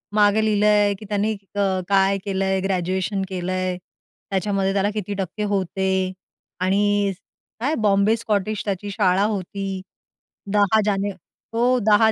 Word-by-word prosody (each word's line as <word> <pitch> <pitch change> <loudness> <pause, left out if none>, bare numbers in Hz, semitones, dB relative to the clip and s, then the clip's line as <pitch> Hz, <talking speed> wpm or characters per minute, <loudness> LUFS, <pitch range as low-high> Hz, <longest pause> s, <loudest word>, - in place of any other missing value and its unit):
मागे 210 +1 +4
लिहिलंय 210 -1 +3
की 215 - -10
त्यांनी 210 +1 +1 0.2
अ, - - -1 0.3
काय 195 0 +4
केलंय 190 -1 0
ग्रॅज्युएशन 190 +1 -1
केलंय. 185 0 -2 0.5
त्याच्यामध्ये 195 0 0
त्याला 200 +1 +1
किती 205 -1 -3
टक्के 195 +3 -3
होते 190 -1 0 0.5
आणि 200 +1 +2 0.5
काय 280 +7 0
बॉम्बे 205 +1 +3
स्कॉटिश 215 -1 -1
त्याची 200 0 -3
शाळा 195 -2 +2
होती. 195 -2 -3 0.7
10 205 +1 +4
जाने 200 -1 0 0.4
हो. 245 +2 +3
10 220 +1 +6
200 Hz, 125 wpm, -22 LUFS, 190-210 Hz, 0.7 s, 10